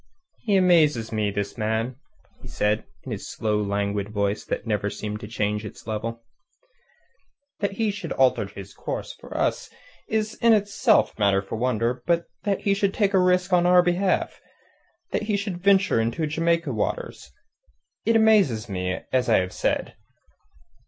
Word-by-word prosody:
"He 210 -4 0
amazes 155 -11 +3
me, 110 -2 0
this 100 +3 -4
man," 110 +3 -1 0.5
said 105 +1 0
he, - - -22 0.2
in - - -7
his - - -5
slow, 105 -1 -1
languid 100 0 -1
voice 100 -1 -1
that - - -3
never 105 -2 -1
seemed 105 +1 -5
to 105 - -8
change 105 -1 -1
its 105 - -10
level. 115 +1 -4 1.4
"That 200 -1 -1
he 220 +1 0
should 200 -5 -7
alter 130 -6 +2
his 100 0 -10
course - - -5
for - - -9
us - - -1 0.4
is 220 0 0
in 230 -1 +6
itself 210 +2 +3
matter 100 -1 +3
for 95 - -6
wonder; 120 +1 0
but 170 -1 +2 0.2
that 200 -2 0
he 200 - +2
should 200 0 0
take 205 -2 +1
a 190 - +5
risk 180 0 +2
on 175 0 +4
our 180 0 +6
behalf 180 +2 0 0.7
that - - 0
he 205 - +2
should 195 -3 -4
venture 190 - +4
into 120 +8 -1
Jamaica 165 -1 0
waters.... 85 - -3 0.7
It 230 +1 +2
amazes 200 - +4
me, 90 -2 -3
as 125 -2 +2
I 110 - +5
have 90 0 -1
said." - - -1
125 Hz, 165 wpm, -24 LUFS, -, 1.4 s, in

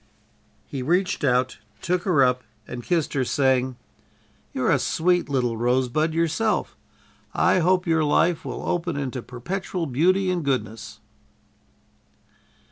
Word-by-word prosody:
He 135 - -5
reached 180 +7 0
out, 125 -3 +1 0.2
took 180 0 -1
her 165 -8 +4
up 125 0 +2 0.3
and 125 - -6
kissed 170 -1 0
her, 135 - +1
saying: 130 -1 +1 0.8
"You're - - 0
a - - +3
sweet 175 0 +1
little 125 -4 0
rosebud 130 +6 +1
yourself. 170 +7 0 0.6
I - - +3
hope 180 +1 +2
your 160 -2 +2
life 165 +3 +2
will - - -5
open 170 -3 -1
into 130 -3 -3
perpetual 175 +9 -4
beauty 185 +8 +2
and 175 -3 -1
goodness." 115 -6 -3
150 Hz, 125 wpm, -24 LUFS, 125-175 Hz, 0.8 s, her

